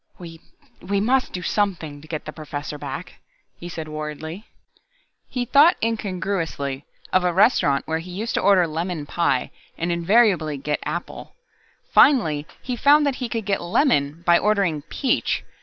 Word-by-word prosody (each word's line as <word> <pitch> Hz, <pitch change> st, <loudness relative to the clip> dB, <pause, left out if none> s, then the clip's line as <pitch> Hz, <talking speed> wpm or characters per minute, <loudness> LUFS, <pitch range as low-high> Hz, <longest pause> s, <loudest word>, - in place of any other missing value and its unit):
"We 165 Hz, -2 st, -11 dB, 0.4 s
we 200 Hz, +2 st, -1 dB
must 255 Hz, +5 st, +1 dB
do 180 Hz, -, -5 dB
something 170 Hz, -8 st, -1 dB
to 155 Hz, -, -14 dB
get 155 Hz, -1 st, -5 dB
the 155 Hz, -, -7 dB
Professor 150 Hz, -1 st, -6 dB
back," 140 Hz, +4 st, -7 dB, 0.4 s
he 175 Hz, -, -7 dB
said 160 Hz, -2 st, -6 dB
worriedly. 155 Hz, +5 st, -6 dB, 0.8 s
He 250 Hz, -2 st, -2 dB
thought 295 Hz, +8 st, +5 dB
incongruously 185 Hz, -10 st, -2 dB, 0.3 s
of 185 Hz, -, +4 dB
a 180 Hz, -, +2 dB
restaurant 180 Hz, -, +3 dB
where 160 Hz, 0 st, -1 dB
he 170 Hz, +3 st, -9 dB
used 210 Hz, +6 st, -4 dB
to -, -, 0 dB
order 190 Hz, -2 st, +5 dB
lemon 165 Hz, 0 st, -3 dB
pie 140 Hz, -5 st, 0 dB, 0.3 s
and 170 Hz, +1 st, -1 dB
invariably 170 Hz, -3 st, +2 dB
get 150 Hz, +2 st, -2 dB
apple. -, -, -6 dB, 0.6 s
Finally 160 Hz, -, +4 dB, 0.2 s
he 250 Hz, -, -3 dB
found 290 Hz, +4 st, +5 dB
that 275 Hz, -2 st, 0 dB
he 250 Hz, -3 st, -4 dB
could 225 Hz, -3 st, -3 dB
get 200 Hz, -1 st, 0 dB
lemon 170 Hz, -, +1 dB
by 170 Hz, 0 st, +5 dB
ordering 200 Hz, -8 st, +1 dB
peach. 265 Hz, -4 st, 0 dB
175 Hz, 155 wpm, -22 LUFS, 155-210 Hz, 0.8 s, thought